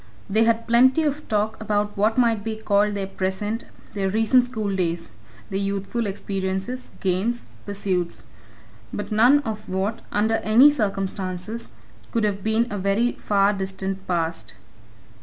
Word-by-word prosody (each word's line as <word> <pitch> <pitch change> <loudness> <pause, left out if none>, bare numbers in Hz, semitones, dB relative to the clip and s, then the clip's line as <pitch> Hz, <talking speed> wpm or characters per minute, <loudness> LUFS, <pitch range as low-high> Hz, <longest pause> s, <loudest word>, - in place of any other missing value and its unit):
They 220 +3 +3
had 230 0 +2
plenty 260 +6 +5
of 295 0 -2
talk 215 +1 0
about 210 -1 0
what 215 +3 +2
might 230 -4 +3
be 220 0 -3
called 210 -1 +1
their 200 -1 -2
present 195 +3 -3 0.3
their 195 -2 0
recent 225 +5 +4
schooldays, 190 -8 -2 0.4
their 195 - -1
youthful 200 +3 -2
experiences, 195 +4 -3
games, 195 +6 0 0.2
pursuits 190 -4 -2 0.7
but - - -5
none 245 +7 +5
of 215 -4 -5
what, 195 +5 -1
under 220 +2 +2
any 235 +8 +6
circumstances, 195 -3 -3 0.4
could 230 -2 0
have 200 -2 -1
been 220 +2 +2
a 205 - -3
very 200 +6 +2
far 200 0 +2
distant 190 0 -4
past. 165 -2 -2
210 Hz, 140 wpm, -24 LUFS, 195-225 Hz, 0.7 s, any